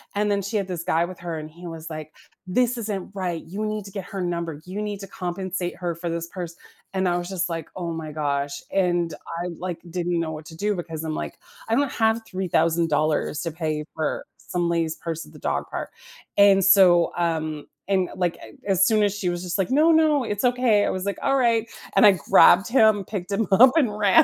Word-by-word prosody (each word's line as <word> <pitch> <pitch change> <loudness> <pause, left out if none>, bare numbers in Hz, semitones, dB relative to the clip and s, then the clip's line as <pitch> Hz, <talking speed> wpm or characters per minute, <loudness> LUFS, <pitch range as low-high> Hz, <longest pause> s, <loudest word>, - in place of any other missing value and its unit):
and 210 +1 +1
then 200 -1 +1
she 200 +3 -2
had 200 -2 -1
this 175 -3 -4
guy 165 0 +2
with 180 0 -9
her, 170 -2 -4
and 155 0 -8
he 170 +3 -13
was 165 -1 -7
like, 155 -1 -7 0.3
"This 245 +6 +1
isn't 210 -5 -4
right, 175 -4 -2
you 200 +6 -4
need 215 -1 -3
to 200 - -10
get 195 -1 -5
her 195 0 -5
number; 170 -3 -3
you 190 +3 -5
need 205 -1 -4
to 195 - -8
compensate 180 -1 -4
her 175 -2 -3
for 170 +1 -4
this 170 0 -3
purse," 175 -2 -7 0.4
and 190 -1 +1
I 175 - +1
was 175 0 -4
just 190 -1 -1
like, 165 -2 -4
"Oh 175 -2 -3
my 160 -1 -5
gosh," 140 -2 -2
and 175 -3 +1 0.3
I, - - -3
like, 180 -2 -4
didn't 175 0 -1
know 165 -1 -2
what 155 0 -7
to 160 - -11
do 205 +4 0
because 165 -3 -5
I'm 155 -1 -2
like, - - -5 0.3
"I - - +1
don't 280 -2 +1
have 225 0 +2
$3,000 165 -5 +1
to 165 - -3
pay 155 -2 -3
for 155 -1 -2
some 175 -1 -2
lady's 165 -2 0
purse 165 -2 -5
at 150 - -16
the 150 - -13
dog 70 - -1
park." - - -4 0.5
And 200 -1 +6
so, 180 -3 +6
um, 155 -3 -1 0.2
and, 190 -2 +1
like, 180 -2 -1
a 110 - -13 0.2
as 190 0 +4
soon 215 -1 +3
as 205 -2 +2
she 195 - -2
was 175 0 -3
just 180 +1 -2
like, 195 - 0
"No, 305 +5 +5
no, 310 -3 +4
it's 205 -2 -3
okay," 245 -4 +3
I - - 0
was 185 - -3
like, 200 - -2
"Alright," 235 -5 +2 0.3
and 235 - +7
I 205 - +8 0.2
grabbed 195 +3 +7
him, 220 -5 +4
picked 195 -3 -5
him 215 +3 +1
up, 245 +7 +8
and 245 -10 +2
ran. 210 +10 +6
180 Hz, 230 wpm, -24 LUFS, 165-205 Hz, 0.5 s, I